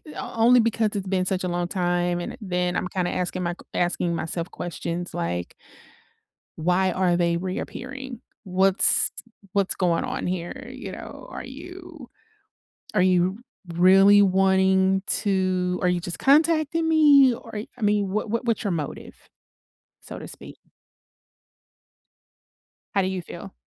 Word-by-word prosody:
only 235 +2 +3
because 225 -1 +1
it's 200 -1 -3
been 185 -1 0
such 185 0 -1
a - - -1
long 175 0 -1
time 175 -1 0
and 175 - -5
then 180 -2 -1
I'm - - -1
kinda 180 -1 -2
asking 180 0 -2
my 175 0 -1
q - - -16
asking 175 -1 0
myself 165 +1 -3
questions 175 0 -5
like 85 +1 -3 1.0
"Why 180 +3 +1
are 180 -1 +1
they 170 -1 +1
reappearing? 250 +7 -6 0.2
What's 190 0 +3 0.4
what's 200 -2 +1
going 175 -3 +1
on - - -3
here, 175 -1 -5
you - - -8
know, - - -10
are - - -7
you 350 -7 -11 0.9
are 190 - +3
you 185 +1 +2 0.4
really 195 +3 +6
wanting 190 0 +3
to 185 -2 0
are 180 - +3
you 180 -1 +1
just 175 0 -5
contacting 315 +2 +3
me 290 -5 +6
or 225 -2 -7
I 245 - -14
mean, 205 -2 +1
what 215 +2 -2
what 230 +2 -1
what's 230 0 0
your 200 - 0
motive?" 160 -5 -5 0.9
So - - -9
to - - -8
speak. - - -11 2.4
How 195 - +3
do 185 - 0
you 190 -1 -3
feel? - - -10
190 Hz, 145 wpm, -24 LUFS, 180-215 Hz, 2.4 s, really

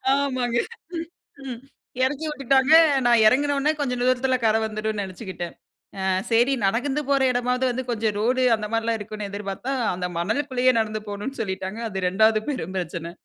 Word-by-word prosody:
ஆமாங்க. 255 -4 0 0.9
ம் 245 -3 -6 0.5
எறக்கி 290 +4 -2
விட்டுட்டாங்க. 275 0 +2 0.3
நான் 235 -2 +5
இறங்கினவுன்னே 285 +4 +2
கொஞ்சம் 250 -3 -1
தூரத்தில 255 +1 +2
கர 220 0 +3
வந்துரும்ன்னு 215 -1 -3
நெனச்சுக்கிட்டேன். 185 -2 -7 0.5
ஆ - - -2 0.3
சரி 240 +4 +4
நடந்து 265 +8 0
போற 275 -1 +3
எடமாவது 250 +1 0
வந்து, 260 +2 -3
கொஞ்சம் 220 -2 -1
ரோடு 255 +4 +1
அந்த 210 -1 -5
மாரிலாம் 225 0 0
இருக்கும்னு 210 -1 -6
எதிர்பாத்தா, 205 +6 -4 0.2
அந்த 180 0 -3
மணலுக்குள்ளயே 255 +5 +1
நடந்து 215 -1 -2
போணும்னு 210 +6 -5
சொல்லிட்டாங்க. 190 +2 -4
அது 190 -2 -3
2வது 215 +3 +3
பெரும் 190 - -4
பிரச்சனை. 170 -1 -4
230 Hz, 145 wpm, -24 LUFS, 205-260 Hz, 0.9 s, நான்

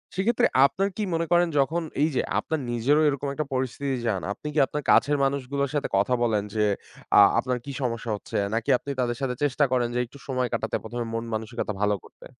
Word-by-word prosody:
সেক্ষেত্রে 210 +6 +2 0.2
আপনার 195 +8 +1
কি 215 - -1
মনে 165 0 0
করেন 175 0 +5
যখন 165 +5 +1 0.2
এই 155 - +4
যে - - +3 0.2
আপনার 160 - -2
নিজেরও 135 +6 +2
এরকম 140 -1 -1
একটা 150 +2 -2
পরিস্থিতি 130 +1 -1
যান, 95 -5 0
আপনি 125 - -6
কি 155 - +1
আপনার 150 0 -4
কাছের 145 0 +4
মানুষগুলোর 140 0 -1
সাথে 145 - 0
কথা 100 +6 +2
বলেন 110 -3 +1
যে 110 - +1 0.5
আ - - +8 0.2
আপনার 125 -1 -1
কি 140 - -5
সমস্যা 115 -2 -2
হচ্ছে - - -9 0.2
নাকি 115 0 -1
আপনি 140 - -6
তাদের 120 -1 0
সাথে 130 -2 -1
চেষ্টা 145 0 +2
করেন 125 -2 +2
যে - - +1
একটু 130 +4 -15
সময় 130 -2 0
কাটাতে - - -1
১ম 120 - -6
এ - - -7
মন-মানসিকতা 115 0 -3
ভালো 105 0 +2
করতে? - - -16
130 Hz, 210 wpm, -26 LUFS, 120-145 Hz, 0.5 s, আ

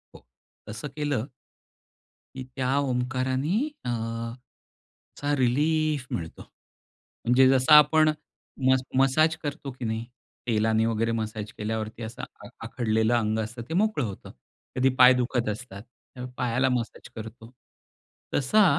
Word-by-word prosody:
हो, - - -15 0.4
तसं 110 +6 -6
केलं 145 -5 -1 1.1
की 130 - -5
त्या 130 +1 0
ओंकारानी 130 +4 0 0.3
अ, - - -2
असा 115 +5 -6
रिलीफ 150 +3 +1
मिळतो. 80 -2 -5 0.8
म्हणजे 130 +2 +5
जसं 135 +3 +4
आपण 155 +1 +7 0.6
मस 130 0 +4 0.2
मसाज 155 +5 +4
करतो 145 -1 -4
की 125 -1 -7
नाही. 110 +1 -2 0.4
तेलाने 110 0 +2
वगैरे 115 0 0
मसाज 110 -1 -4
केल्यावरती 110 +1 -4
असं 110 +2 -7
आ - - -11 0.2
आखडलेलं 110 -1 0
अंग 110 -1 0
असतं 115 +2 -5
ते - - -3
मोकळं 205 -4 +1
होतं. 100 -2 -8 0.4
कधी 130 +1 +3
पाय 125 0 +9
दुखत 120 -2 0
असतात, 105 -2 -7 0.3
तेव्हा 125 0 -7
पायाला 125 +2 +1
मसाज 120 -2 -3
करतो. 110 +1 -9 0.8
तसा 175 +11 +4
125 Hz, 125 wpm, -26 LUFS, 110-135 Hz, 1.1 s, पाय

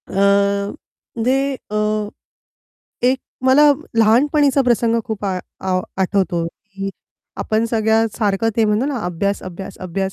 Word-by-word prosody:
अ, - - -11 1.1
ते 270 +2 +2 0.2
अ, 210 0 0 1.0
एक 260 +1 +3 0.3
मला 260 +3 +6 0.4
लहानपणीचा 275 +5 +4
प्रसंग 235 -2 +2
खूप 215 -2 -5
आ 190 -2 -1 0.2
आ 185 -1 0 0.2
आठवतो 180 -3 0
की 195 +2 -7 0.5
आपण 220 +1 0
सगळ्यासारखं 220 -2 +1
ते 225 - +4
म्हणतो 215 +4 +1
ना, 285 -3 -2
अभ्यास, 200 +3 -1
अभ्यास, 190 +2 -8
अभ्यास 190 +1 -3
215 Hz, 120 wpm, -19 LUFS, 195-240 Hz, 1.1 s, मला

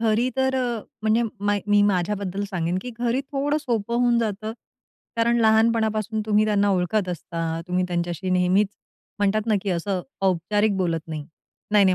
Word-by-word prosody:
घरी 230 +2 +2
तर 265 0 +2
अ, 240 -3 -1 0.2
म्हणजे 220 +2 +3 0.2
मै 205 0 +2
मी 205 0 +4
माझ्याबद्दल 200 0 0
सांगेन, 175 -1 -1
की 250 - -6
घरी 240 +2 +1
थोडं 285 +2 -1
सोपं 235 -3 -2
होऊन 240 -1 +3
जातं. 215 -1 -2 0.6
कारण 235 +1 +3
लहानपणापासून 220 -1 +2
तुम्ही 215 0 +3
त्यांना 205 -1 +2
ओळखत 185 +2 +1
असता. 165 -1 -3
तुम्ही 180 0 +1
त्यांच्याशी 175 +1 -2
नेहमीच 185 +3 +3 0.5
म्हणतात 205 +2 +1
ना, 220 - +3
की 200 - -2
असं 180 +2 -1 0.2
औपचारिक 195 +3 +1
बोलत 170 -3 0
नाही, 155 -2 -5 0.5
"नाही, 205 -2 +6
नाही, 185 - +4
205 Hz, 160 wpm, -24 LUFS, 185-225 Hz, 0.6 s, नाही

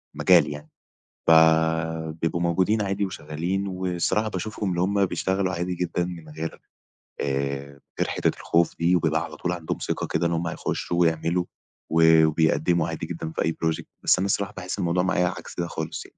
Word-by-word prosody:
المجال 85 -5 +5
يعني. 75 +1 -8 0.6
فبيبقوا 80 0 +3
موجودين 95 +5 +2
عادي 100 0 0
وشغّالين، 90 +2 -3
والصراحة 95 +3 -1
باشوفهُم، 105 +1 -3
اللي 90 -1 0
هُم 100 +2 +2
بيشتغلوا 95 0 -1
عادي 90 +1 -2
جدًا 90 0 -1
من 85 -3 -8
غيّر 80 +2 -6 0.6
آآ، 70 0 -1
من 70 - -19 0.2
غير - - +2
حتّة - - 0
الخوف 85 0 +1
دي، 85 +2 +3
وبيبقى 80 -1 +1
على 85 - -8
طول 90 - -2
عندهم 85 -3 -3
ثقة - - -2
كده 85 - 0
إن - - -2
هُم 85 0 -1
هيخشّوا 85 +1 -3
ويعملوا، 85 +1 +1 0.5
و 80 0 +6
وبيقدموا 80 +1 +2
عادي 80 -1 -4
جدًا 80 -1 -5
في - - -3
أي 80 - +2
project، 80 -1 -1 0.2
بس - - +4
أنا 95 - 0
الصراحة 100 0 -1
باحس 90 +1 -5
الموضوع 90 0 +1
معايا 90 -1 +2
عكس 90 - -6
ده 85 - 0
خالص 80 -2 -5
يعني. - - -19
85 Hz, 180 wpm, -25 LUFS, 80-90 Hz, 0.6 s, و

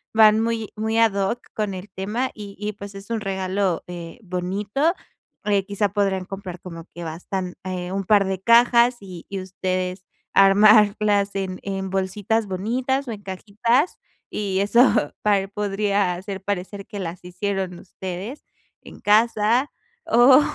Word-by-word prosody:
van 215 -1 +7
muy 225 -1 -1
muy 220 +1 -1
ad 225 -2 +4
hoc 200 +4 0 0.2
con 210 -2 -1
el 185 +2 -8
tema, 210 +7 -2
y 205 -2 -9
y 210 +1 -3
pues 200 0 -9
es 195 +2 -10
un 230 -1 -1
regalo, 190 -2 -1
eh, 175 +3 -8
bonito. 200 - -1 0.5
Eh, 200 -2 +2
quizá, 205 0 0
podrán 195 -1 0
comprar 190 -2 -7
como 165 -2 -9
que 175 - -6
bastante, 180 +3 -4
eh, 180 -1 -4
un 195 0 -2
par 205 0 +4
de 190 -1 -2
cajas 235 +2 +5
y 185 -4 -10 0.2
ustedes 185 0 -3 0.3
armarlas 205 0 +5
en 190 -1 -3
en 195 -1 -3
bolsitas 195 +3 -1
bonitas, 245 +8 -1
o - - -3
en 210 -2 -7
cajitas. 215 - 0 0.3
Y 195 -2 -1
eso 220 - +4
tal 200 -2 +2
podría 200 -2 0
hacer 190 +1 -6
parecer 200 0 -4
que 205 - -7
las 175 -1 -5
hicieron 185 0 -3
ustedes 190 +8 -7 0.4
en - - -12
casa. 225 +4 +3 0.3
O 255 +4 +7
200 Hz, 150 wpm, -23 LUFS, 185-215 Hz, 0.5 s, van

